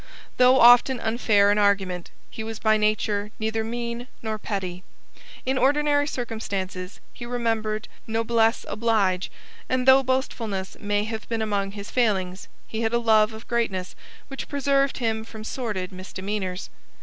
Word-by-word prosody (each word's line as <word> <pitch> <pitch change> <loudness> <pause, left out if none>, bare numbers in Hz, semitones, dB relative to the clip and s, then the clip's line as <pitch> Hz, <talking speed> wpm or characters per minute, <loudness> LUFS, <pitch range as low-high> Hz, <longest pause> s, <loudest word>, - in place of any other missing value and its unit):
Though 255 +1 +6
often 245 +1 +7
unfair 220 -3 +3
in 210 - +2
argument, 195 -4 +1 0.2
he 220 - -6
was 225 0 -5
by 220 0 +3
nature 210 -1 0
neither 220 0 -1
mean 235 +1 -4 0.2
nor 220 -1 -3
petty. 185 -4 -4 0.6
In 260 0 +1
ordinary 290 +1 +3
circumstances 200 -7 -4
he - - -9
remembered 225 -3 -1 0.2
noblesse 225 +1 +1
oblige, 205 -5 +1 0.4
and 255 0 0
though 265 +1 +8
boastfulness 230 -7 -2
may 205 0 0
have 220 0 -6
been 225 -1 -1
among 200 -2 -1
his 200 0 -8
failings, 195 -6 0 0.2
he 220 - -4
had 225 0 0
a - - +4
love 220 -2 +4
of 220 +1 -11
greatness 200 -6 -1 0.3
which 270 - -7
preserved 275 -1 +1
him 225 -3 -1
from 220 -1 -10
sordid 210 -6 -4
misdemeanours. 190 0 -5
220 Hz, 145 wpm, -25 LUFS, 200-240 Hz, 0.6 s, though